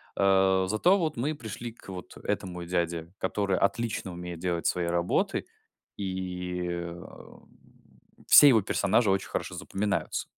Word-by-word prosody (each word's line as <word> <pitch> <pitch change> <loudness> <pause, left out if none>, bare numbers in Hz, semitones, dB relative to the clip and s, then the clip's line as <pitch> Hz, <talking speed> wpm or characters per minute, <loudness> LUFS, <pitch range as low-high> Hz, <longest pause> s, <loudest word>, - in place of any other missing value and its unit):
Э. 95 -1 +3
Зато 175 - +3
вот 160 -7 -2
мы 145 +6 -1
пришли 115 -2 -7
к 105 - -16
вот 90 -1 -8
этому 90 -2 -3
дяде, 85 -1 -2
который 100 0 0
отлично 105 -2 -1
умеет 90 -1 -7
делать 85 -2 -2
свои 90 -1 0
работы. 85 +1 0 0.5
И, 90 -2 -4
эм, 85 0 -8 0.8
все 145 - +9
его 115 -6 +6
персонажи 105 +2 +2
очень 95 0 +1
хорошо 90 - -4
запоминаются. 100 +2 -2
95 Hz, 135 wpm, -28 LUFS, 90-105 Hz, 0.8 s, все